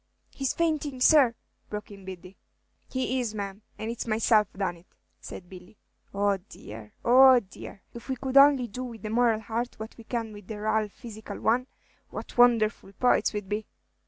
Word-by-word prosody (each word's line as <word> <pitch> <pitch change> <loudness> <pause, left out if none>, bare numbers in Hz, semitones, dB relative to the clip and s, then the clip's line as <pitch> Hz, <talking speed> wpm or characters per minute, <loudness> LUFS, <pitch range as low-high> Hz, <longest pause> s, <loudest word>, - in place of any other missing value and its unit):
"He's 270 -2 -2
fainting, 305 -5 -1
sir," 255 -3 +5 0.3
broke 210 0 -6
in 195 -1 -12
Biddy. 185 0 -9 0.5
"He 260 0 -1
is, 230 -3 -3
ma'am, 200 0 -5 0.2
and 220 +2 -4
it's 235 - -5
myself 215 -1 +3
done 190 -3 -3
it," 170 - -21 0.3
said 180 - -9
Billy. 185 +2 -13 0.3
"Oh, 200 0 +1
dear, 110 - -12
oh, 255 +1 +8
dear! 195 -2 -12
If 235 +3 -11
we 265 - 0
could 265 +1 -5
only 275 -2 +7
do 250 +4 -6
with 235 -3 -8
the 215 - -4
moral 230 -1 +2
heart 230 +3 -4
what 220 +1 -7
we - - -10
can 225 -2 -4
with 205 -2 -12
the 215 -1 -6
raal 215 0 0
physical 220 -3 -9
one, 250 +3 +1 0.4
what - - -8
wonderful 230 -4 +3
poets 250 +4 +2
we 210 - -3
'd 190 - -19
be!" 210 +1 -3
220 Hz, 185 wpm, -27 LUFS, 205-245 Hz, 0.5 s, oh